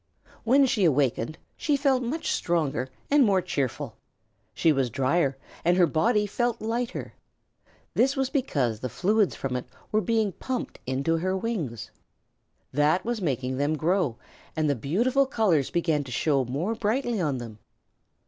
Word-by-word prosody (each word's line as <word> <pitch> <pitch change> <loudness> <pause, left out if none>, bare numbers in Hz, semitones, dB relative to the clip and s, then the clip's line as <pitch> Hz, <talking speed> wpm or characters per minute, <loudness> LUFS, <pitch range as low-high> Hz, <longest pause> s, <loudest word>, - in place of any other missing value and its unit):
When 270 +4 +5
she 225 -6 +1
awakened 145 -3 +1 0.2
she 295 -2 +1
felt 270 -2 +2
much 265 +7 -2
stronger 150 -7 0 0.2
and 290 -1 +6
more 200 -5 +4
cheerful. 140 -7 -3 0.5
She 165 - +3
was 135 -4 +1
drier 135 +3 +1 0.3
and 175 +2 +3
her 180 - +6
body 210 +7 +2
felt 240 +3 -1
lighter. 235 +3 -3 0.8
This 270 +2 +3
was 270 -1 -1
because 140 - 0
the 130 - -4
fluids 205 - +1
from 130 -2 -3
it 125 - -4 0.2
were 215 - +3
being 220 0 +1
pumped 255 +7 -4
into 140 +5 0
her 185 +3 0
wings. 180 - -3 0.8
That 150 +6 +2
was 235 -2 -2
making 130 -5 -1
them 145 +3 0
grow, 160 - +1 0.4
and 155 -1 +1
the 145 - +3
beautiful 240 - +1
colors 195 - +2
began 160 -4 +1
to 130 - -9
show 135 +1 +1
more 150 - -2
brightly 230 0 0
on 145 -5 0
them. 115 -3 -8
175 Hz, 155 wpm, -26 LUFS, 140-230 Hz, 0.8 s, and